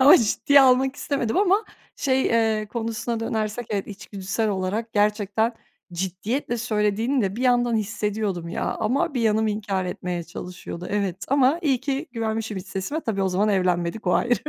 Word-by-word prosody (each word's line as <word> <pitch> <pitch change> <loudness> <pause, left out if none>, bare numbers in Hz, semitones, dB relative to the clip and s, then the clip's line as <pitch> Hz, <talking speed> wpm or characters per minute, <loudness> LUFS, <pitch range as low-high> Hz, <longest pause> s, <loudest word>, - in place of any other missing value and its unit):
Ama 270 +3 +9
ciddiye 275 +5 +4
almak 265 +1 +4
istemedim 270 -7 -1
ama, 400 +2 +3 0.3
şey, 265 -1 +1
eee, 220 -2 +2
konusuna 230 0 -3
dönersek, 220 +1 -2
evet, 200 -2 -1
içgüdüsel 200 +1 -3
olarak 205 +4 -2
gerçekten, 210 +2 +1 0.4
ciddiyetle 195 +8 -2
söylediğini 220 +3 +1
de 195 +1 -1
bir 250 - -3
yandan 245 -2 +3
hissediyordum 210 -4 -2
ya - - -3
ama 250 +6 0
bir 245 - 0
yanım 220 0 +2
inkâr 205 -3 -1
etmeye 180 -1 -3
çalışıyordu, 175 0 -7
evet, 200 -3 0
ama 275 +3 +4
iyi 270 -6 +2
ki 275 +4 -2
güvenmişim 220 -2 -2
iç 185 - -6
sesime. 240 +12 -3
Tabii, 200 -7 -1
o 190 - +2
zaman 195 +4 +1
evlenmedik, 180 0 0
o 180 - +3
ayrı. 245 0 +3
220 Hz, 160 wpm, -24 LUFS, 195-245 Hz, 0.4 s, Ama